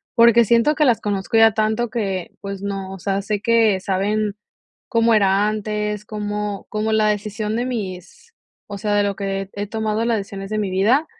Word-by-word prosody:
porque 235 -1 +6
siento 235 +7 +3
que 300 0 +2
las 240 -4 +3
conozco 205 +2 -1
ya 225 -1 +6
tanto 220 +2 0
que, 195 -6 -3
pues, 200 0 -6
no, 195 -1 -4
o 195 - -7
sea, 195 +2 -1
sé 205 0 -2
que 225 -4 +3
saben 205 +2 -1 0.5
cómo 230 -2 +3
era 200 -1 +3
antes, 210 -1 -2
cómo 210 -1 -4
cómo 215 0 -1
la 215 -1 +3
decisión 210 +1 -2
de 245 - -1
mis 210 - -6 0.3
o 205 - -6
sea, 210 0 0
de 205 - +3
lo 200 -1 -1
que 195 0 -3
he 205 0 -4
tomado 220 +1 -1
las 235 -1 +1
decisiones 195 -1 -6
de 215 - -2
mi 195 -3 -2
vida. 225 +11 +3
210 Hz, 195 wpm, -21 LUFS, 200-225 Hz, 0.5 s, porque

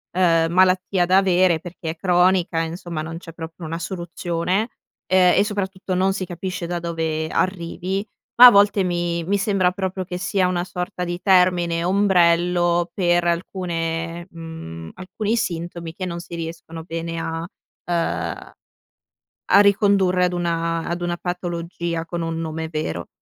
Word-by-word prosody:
ehm, 165 -3 +3
malattia 185 0 +3
da 185 +2 +4
avere 185 -3 +3
perché 175 -2 -7
è - - -8
cronica 180 -1 +2
insomma 165 0 -4
non 165 +1 -6
c'è 165 -1 -11
proprio 165 +1 -8
una 165 +1 -3
soluzione, 175 +3 -2 0.4
ehm, 185 -1 +4
e - - +5
soprattutto 195 -2 -3
non 190 +1 +2
si 190 -1 -3
capisce 180 0 -5
da 175 0 -2
dove 160 -2 -2
arrivi, 185 +2 -2 0.3
ma 250 - +13
a - - +9
volte 200 -1 +4
mi 175 -1 -1
mi 200 +4 +1
sembra 195 -3 +2
proprio 190 0 -3
che 180 0 -5
sia 185 +1 +1
una 175 -1 -1
sorta 180 0 -4
di 175 +1 -4
termine 180 -3 +3
ombrello, 175 -2 +3
per 175 -2 +2
alcune 170 -1 -2
mhmm, 160 - -9
alcuni 210 +4 -2
sintomi 170 -3 -4
che 185 +2 -5
non 170 -1 -4
si 170 0 -8
riescono 165 0 -7
bene 165 0 -4
a 165 0 -3 0.5
ehm, 175 - -1 0.4
a - - -14 1.0
a 200 - +8
ricondurre 200 -3 +4
ad 180 - -2
una 165 -1 -1
ad 175 +1 -3
una 175 0 -1
patologia 170 -2 -4
con 170 0 -4
un 165 0 -3
nome 160 0 -4
vero. 85 - -3
175 Hz, 155 wpm, -22 LUFS, 165-185 Hz, 1.0 s, ma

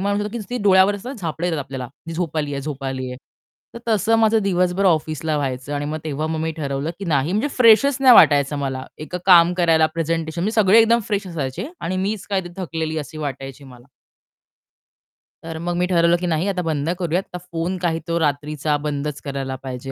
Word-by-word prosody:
मला 200 +1 0
म्हणतो 210 +3 -3
की 245 - -3
डोळ्यावर 190 0 +5
असं 235 +6 -6
झापडं 170 -2 -3
येतात 165 -3 -1
आपल्याला. 135 -2 -6 0.2
ती 165 - -5
झोप 165 -2 -3
आलीये, 145 -2 -2
झोप 140 -1 -6
आलीये. 130 -1 -4 0.6
तर - - -6
तसं 220 +1 +2
माझं 225 0 +4
दिवसभर 180 0 +1
ऑफिसला 155 -2 0
व्हायचं 135 -1 -3
आणि 145 0 -2
मग 155 +1 -3
तेव्हा 155 0 -2
मग 160 0 -2
मी 160 0 -1
ठरवलं 140 0 -3
की 200 - -6
नाही 150 0 0
म्हणजे 215 +9 0
फ्रेशच 250 +3 +5
नाही 260 -2 +8
वाटायचं. 145 -4 +5
मला 135 -2 -3
एक 155 +4 -6
काम 175 -2 +7
करायला 165 -3 +3
प्रेझेंटेशन, 165 0 -2
म्हणजे 215 +4 -1
सगळे 205 +2 +6
एकदम 230 +1 +4
फ्रेश 205 -2 -1
असायचे 165 - -4
आणि 180 +3 -2
मीच 195 +1 -2
काय 195 -1 +1 0.2
थकलेली 160 -4 -3
अशी 155 +1 -7
वाटायची 135 -2 -6
मला. 125 -2 -14 1.6
तर 165 0 -6
मग 175 0 -1
मी 180 - +2
ठरवलं 170 -1 +3
की 180 +1 -3
नाही 165 +2 0
आता 195 -2 -1
बंद 155 -2 -2
करूया. 175 -1 0
आता 185 -1 -7
फोन 170 +3 -2
काही 170 -2 0
तो 170 0 0
रात्रीचा 150 0 -1
बंदच 150 0 -3
करायला 135 -1 -3
पाहिजे 130 0 -6
165 Hz, 195 wpm, -21 LUFS, 145-190 Hz, 1.6 s, नाही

